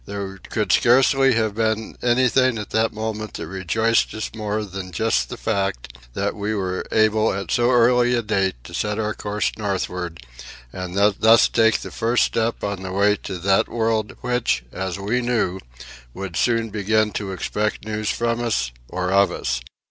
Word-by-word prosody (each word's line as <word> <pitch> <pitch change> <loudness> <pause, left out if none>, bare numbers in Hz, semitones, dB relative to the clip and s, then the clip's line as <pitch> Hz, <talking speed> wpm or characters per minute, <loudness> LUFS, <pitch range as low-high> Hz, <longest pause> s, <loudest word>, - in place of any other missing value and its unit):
There 100 -1 -5
could 105 -2 -1
scarcely 135 +2 +4
have 110 -2 +1
been 110 0 -1
anything 130 0 +3
at 105 -1 -6
that 110 0 +2
moment 110 -1 -5
that - - -5
rejoiced 95 +6 +1
us 110 - -4
more 110 -1 -2
than 95 -2 -7
just 110 +6 0
that 125 - -6
fact, 95 - -2 0.2
that - - -1
we 105 +2 -3
were 95 -2 -2
able 110 0 +3
at 95 -3 -4
so 120 0 +3
early 125 0 +4
a 120 - 0
date 95 -3 0
to - - -12
set 105 0 -1
our 110 -1 -1
course 105 0 -2
northward 90 -6 -3 0.5
and 90 0 -5
thus 105 +3 +5
take 110 -1 +3
the - - -7
first 115 +2 +1
step 115 +1 -1
on 100 -2 -3
the 95 -1 -5
way 100 +2 +3
to 95 - -6
that 95 +2 +2
world 110 -2 -1
which, 125 - 0
as 95 -1 -4
we 105 +6 -1
knew, 110 -6 0 0.6
would 95 -3 -6
soon 115 0 +1
begin 110 +1 +1
to 100 -2 -4
expect 105 +4 -2
news 110 0 -2
from 120 0 -1
us, 70 - 0 0.2
or 90 0 -2
of 100 -1 +4
us. 65 -6 -2
105 Hz, 175 wpm, -22 LUFS, 95-115 Hz, 0.6 s, thus